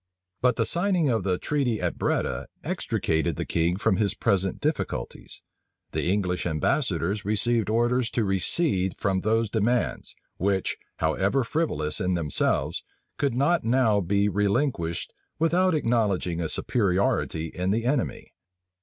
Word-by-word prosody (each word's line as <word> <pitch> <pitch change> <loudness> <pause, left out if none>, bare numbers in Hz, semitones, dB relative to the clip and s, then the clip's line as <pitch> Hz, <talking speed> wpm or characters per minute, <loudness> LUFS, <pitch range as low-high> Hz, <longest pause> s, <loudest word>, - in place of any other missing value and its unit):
But 125 -1 +3
the 115 - +1
signing 175 - +1
of 110 -5 +1
the 90 -1 0
treaty 135 -5 0
at - - -2
Breda - - -1 0.2
extricated 80 0 -1
the - - -3
king 85 +1 +1
from 95 -1 +1
his 100 -1 +1
present 95 -4 0
difficulties. - - -3 0.5
The - - -1
English 90 -3 0
ambassadors 85 +4 0
received 110 +2 +1
orders 120 +2 +2
to 115 - +3
recede 95 - +1
from 95 -2 0
those 110 +1 +1
demands, 120 +3 0 0.2
which, 95 0 0 0.2
how 80 0 +1
ever 100 +8 +1
frivolous 115 - -1
in 90 0 +1
themselves, 80 -5 0 0.4
could 140 -4 +1
not 145 +7 +2
now 115 -3 +3
be 100 +3 +1
relinquished 100 - 0 0.2
without 175 +2 +2
acknowledging 105 - 0
a 80 - -2
superiority 90 -6 0
in 90 +1 -2
the 115 +4 0
enemy. 130 0 -1
105 Hz, 135 wpm, -26 LUFS, 90-125 Hz, 0.5 s, But